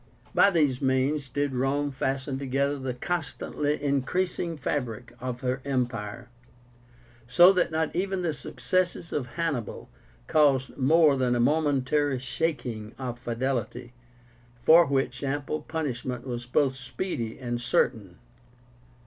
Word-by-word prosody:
By - - +6
these 145 -8 +1
means 135 +2 +1
did 145 +2 -1
Rome 140 +3 0
fasten 135 0 -2
together 140 +1 0
the 130 -2 -3
constantly 150 -1 -2
increasing 165 +5 -1
fabric 125 -4 -3
of 125 -1 -5
her 130 +1 -1
empire, 120 -4 -3 1.0
so 175 +10 +7
that 180 -2 +2
not 160 -1 -1
even 190 0 -1
the 165 -3 0
successes 180 +2 -1
of 130 -4 -1
Hannibal 145 - -3 0.3
caused 135 - +3
more 150 +2 +4
than 125 -2 +1
a - - 0
momentary 145 0 +2
shaking 125 -5 -3
of 125 -2 -5
fidelity, 120 0 -3 0.6
for 160 +7 +6
which 135 -1 -1
ample 145 +2 -2
punishment 130 -6 -4
was 120 -2 -5
both 130 +1 +1
speedy 125 -3 -4
and 120 -2 -3
certain. 105 -6 0
135 Hz, 125 wpm, -27 LUFS, 125-150 Hz, 1.0 s, so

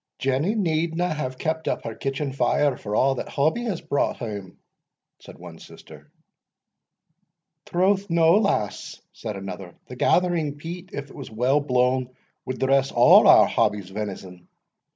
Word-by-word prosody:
"Jenny 135 - 0
needna 170 -2 0
have 130 -4 -4
kept 160 +2 -3
up - - -2
her 115 - -5
kitchen 135 +3 -3
fire 140 0 +1
for 105 -3 -5
a' 135 +3 +3
that - - -5
Hobbie 160 +13 0
has 200 -8 -3
brought 160 -4 -1
hame," 100 -6 -7 0.6
said - - -14
one - - -12
sister. - - -15 1.6
"Troth 190 +2 +1
no, 165 0 +4
lass," 195 - -2
said 110 -3 -6
another; 95 -2 -8
"the 125 - -10
gathering 165 0 +1
peat, 170 +4 -8
if 140 0 -7
it - - -14
was 140 - -8
weel 125 +6 +1
blawn, 125 -2 0 0.4
wad 130 - -3
dress 135 0 +2
a' - - -16
our - - +7
Hobbie's 100 -3 -1
venison." 95 -3 -7
135 Hz, 150 wpm, -24 LUFS, 120-165 Hz, 1.6 s, our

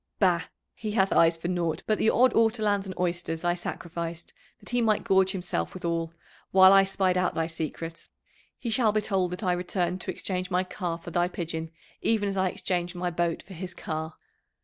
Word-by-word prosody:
"Bah! 180 -4 +3 0.3
he 215 -2 -5
hath 195 -3 +3
eyes 165 0 +5
for 165 - -4
naught 170 -3 -1
but 215 - +1
the 220 - +4
odd 255 +3 +4
ortolans 215 -3 +2
and 185 - -6
oysters 170 -2 -2
I 175 0 +2
sacrificed 170 -1 -5 0.3
that - - -6
he 245 0 +2
might 215 -2 +2
gorge 190 0 +4
himself 175 - -2
withal, 170 -2 -2 0.4
while 190 0 +8
I 195 0 +7
spied 190 -1 +1
out 180 - 0
thy 165 - +1
secret. 165 0 -5 0.5
He 235 - -4
shall 220 -1 +3
be 215 0 +1
told 190 -4 0
that 180 +4 -6
I 180 -2 +2
returned 180 0 -1
to - - -5
exchange 185 -1 -3
my 180 0 +1
car 180 -2 -4
for 170 0 -9
thy 175 +1 +2
pigeon 165 -2 -4 0.3
even 215 -3 +1
as 195 - -2
I 190 -1 +2
exchanged 180 0 -2
my 180 0 -2
boat 170 -1 -1
for 190 - -12
his 180 0 -7
car. 160 0 -4
180 Hz, 200 wpm, -27 LUFS, 170-195 Hz, 0.5 s, while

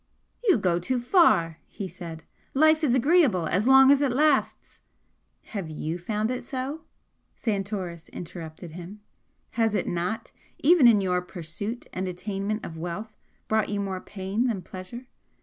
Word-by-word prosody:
"You 395 - +5
go 180 -4 +1
too 245 +9 -1
far!" 240 - +3
he 200 - -6
said 165 -3 -9 0.3
"Life 315 +2 +4
is 255 -5 +3
agreeable 260 - +3
as 195 +8 0
long 265 0 +8
as 285 0 +4
it 280 -3 +2
lasts 290 +2 +1 0.3
" - - -46
"Have 195 -6 -4
you 155 +2 -4
found 215 +5 -1
it 255 - -3
so?" 275 +4 -5 0.5
Santoris 195 -6 -3
interrupted 165 -1 -8
him. 180 +5 -9 0.5
"Has 225 -2 +1
it 200 - -1
not, 180 +6 -3 0.3
even 310 -3 +6
in 215 -4 +6
your 180 -1 +1
pursuit 180 +6 -5
and 185 +1 -3
attainment 195 +3 -3
of 160 -1 -8
wealth, 195 +6 -5 0.3
brought 220 -1 +1
you 205 0 -1
more 190 -2 -3
pain 200 +5 -2
than 205 -7 -2
pleasure? 190 +7 -9
205 Hz, 155 wpm, -26 LUFS, 180-250 Hz, 0.5 s, long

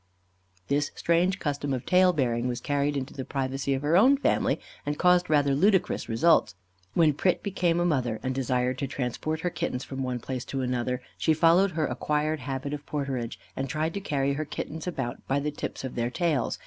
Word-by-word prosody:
This 145 +1 +1
strange 175 +3 +2
custom 145 -4 -2
of 125 - -6
tail 185 0 +5
bearing 125 -6 0
was 120 -1 -2
carried 145 +2 0
into 135 0 -4
the 135 - -5
privacy 135 +1 -1
of 135 - -4
her 150 +3 +2
own 255 +9 +6
family, - - +1 0.2
and 145 0 -2
caused 180 -1 +4
rather 145 -2 +3
ludicrous 190 +3 +2
results. 145 - +3 0.4
When 160 -3 +5
Pret 180 +5 +1
became 175 -4 +1
a 175 - +2
mother, 125 -9 0
and 130 0 -1
desired 130 0 0
to 140 - -1
transport 140 +4 -3
her 180 - -1
kittens 125 -5 -3
from 135 0 -6
one 125 -1 -1
place 125 +1 -4
to 135 - -3
another, 125 0 -1 0.2
she 160 - +3
followed 170 +4 +4
her 155 -1 0
acquired 150 +1 -1
habit 135 +1 -4
of 145 -1 -5
porterage, 135 -5 -3 0.2
and 135 0 -3
tried 155 +4 -1
to 200 - -4
carry 140 -6 0
her 150 +3 -2
kittens 155 +2 -6
about 135 -8 -3
by 135 +1 +1
the 150 +1 -2
tips 145 - -5
of 130 - -4
their 120 0 -1
tails. 150 -3 0
145 Hz, 200 wpm, -27 LUFS, 130-165 Hz, 0.4 s, own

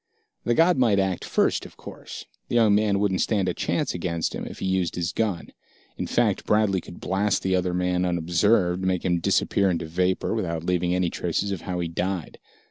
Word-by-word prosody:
The 120 - +2
god 165 -1 +4
might 115 -6 +4
act 95 -2 0
first, - - +1
of - - -12
course. - - -9 0.2
The - - -3
young 110 -3 +5
man 105 -1 +2
wouldn't 100 -2 +1
stand 100 -4 +1
a 90 - 0
chance - - -1
against 85 -2 -2
him - - -5
if - - -9
he - - -4
used 95 -2 0
his 85 0 -2
gun. 100 -6 -2 0.5
In - - -4
fact, - - +1
Bradley 105 -3 +2
could 85 - -12
blast 100 +2 0
the 95 0 +1
other 90 -1 0
man 90 0 0
unobserved, 90 +2 +2
make 95 -1 0
him 90 -2 +2
disappear 100 +3 +2
into 85 -2 -1
vapor, 90 +6 0
without 85 -7 -2
leaving 90 0 0
any 90 -2 0
traces 90 +4 -2
of 95 -4 -3
how 90 -1 -4
he 85 - -1
died. 90 +1 -3
90 Hz, 205 wpm, -25 LUFS, 90-100 Hz, 0.5 s, young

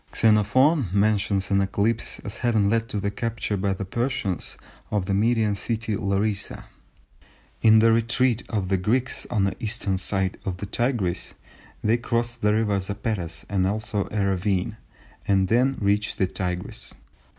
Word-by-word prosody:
Xenophon 115 - +4
mentions 100 -1 +1
an 100 0 +4
eclipse 105 +4 0
as 105 +1 -5
having 110 -5 +2
led 115 0 0
to 105 - -2
the 100 +1 -1
capture 115 -1 -2
by 100 0 0
the 95 +1 -3
Persians 115 -3 -2 0.3
of 105 -3 0
the 95 - -1
Median 110 +1 +2
city 110 +1 -2
Larissa. 100 +1 -1 1.0
In 110 -1 +7
the 115 +1 +6
retreat 120 +1 +2
of 100 -5 -2
the 95 - +2
Greeks 120 +8 -1
on 110 -5 +1
the 95 -1 0
eastern 100 -3 -1
side 95 +2 -1
of 95 -2 -3
the 100 - -5
Tigris, 110 -4 -1 0.5
they 110 +3 +3
crossed 120 0 -2
the 105 - +3
river 105 -3 +1
Zapetes 95 -4 -4
and 95 -2 +1
also 105 0 -2
a 105 -2 0
ravine, 95 +2 0 0.5
and 95 -2 +3
then 130 +4 +3
reached 105 +1 +1
the 95 - +3
Tigris. 90 -1 -5
105 Hz, 155 wpm, -25 LUFS, 95-115 Hz, 1.0 s, In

